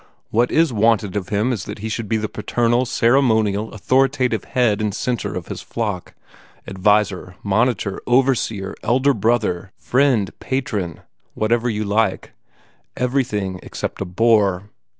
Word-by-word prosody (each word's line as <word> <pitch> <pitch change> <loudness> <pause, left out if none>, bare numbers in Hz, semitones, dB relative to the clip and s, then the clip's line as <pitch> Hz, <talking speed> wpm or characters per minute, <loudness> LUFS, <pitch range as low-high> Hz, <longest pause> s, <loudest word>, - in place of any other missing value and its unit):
What 120 +3 +2
IS 160 -4 +3
wanted 110 -3 +2
of 95 -3 -3
him 110 +5 +1
is 105 -5 -4
that 105 - -6
he 110 +2 -5
should 110 -1 -4
be 110 - +2
the 110 0 -2
paternal, 120 +3 0
ceremonial, 110 -4 +2
authoritative 125 0 +1
head 115 -5 +1
and 105 -2 -1
centre 125 -1 -2
of - - -4
his - - -6
flock, 105 -6 -4 0.5
adviser, 95 -1 +1
monitor, 100 -1 0
overseer, 120 -6 +1
elder 130 +4 +2
brother, 105 -5 0
friend, 125 -6 +2
patron, 125 -8 -2
seigneur - - -21 0.3
whatever 120 +2 +1
you 110 -1 -1
like 105 -1 0 0.7
everything 120 -8 -1
except - - -5
a - - -1
bore. 100 0 +2
110 Hz, 140 wpm, -20 LUFS, 100-120 Hz, 0.7 s, IS